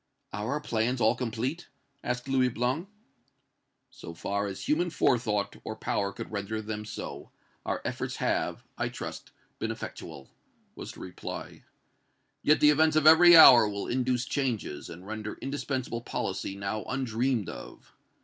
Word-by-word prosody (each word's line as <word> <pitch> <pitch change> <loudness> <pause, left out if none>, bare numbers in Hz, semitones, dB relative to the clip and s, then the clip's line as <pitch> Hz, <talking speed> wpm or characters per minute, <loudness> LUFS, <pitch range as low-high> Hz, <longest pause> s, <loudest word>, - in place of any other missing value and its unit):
"Are 105 +6 -2
our 150 - -1
plans 120 -2 -1
all 110 -1 +4
complete?" 125 +7 -3 0.4
asked 125 +1 -3
Louis 130 -1 +3
Blanc. 130 - -2 1.0
"So 85 - -10
far 100 +4 -2
as 95 -1 -6
human 170 +4 +2
forethought 110 -9 +1
or 110 - -5
power 100 -2 -1
could - - -8
render 105 +1 -3
them 105 0 -5
so, 105 - -7 0.4
our - - -2
efforts - - -3
have, - - -1 0.2
I - - 0
trust, - - -7 0.3
been - - -2
effectual," 70 - -8 0.4
was - - -8
the - - -12
reply. 90 - -8 0.8
"Yet 150 - +3
the 150 - +7
events 155 +1 +3
of 155 -1 +3
every 170 +2 +9
hour 120 -8 +9
will 100 -1 -4
induce 125 0 0
changes, 120 - -3
and 90 +3 -10
render 105 0 -5
indispensable 130 -3 -3
policy 95 -3 -3
now 100 +2 -3
undreamed 125 -3 -1
of. - - -10
120 Hz, 150 wpm, -28 LUFS, 105-135 Hz, 1.0 s, every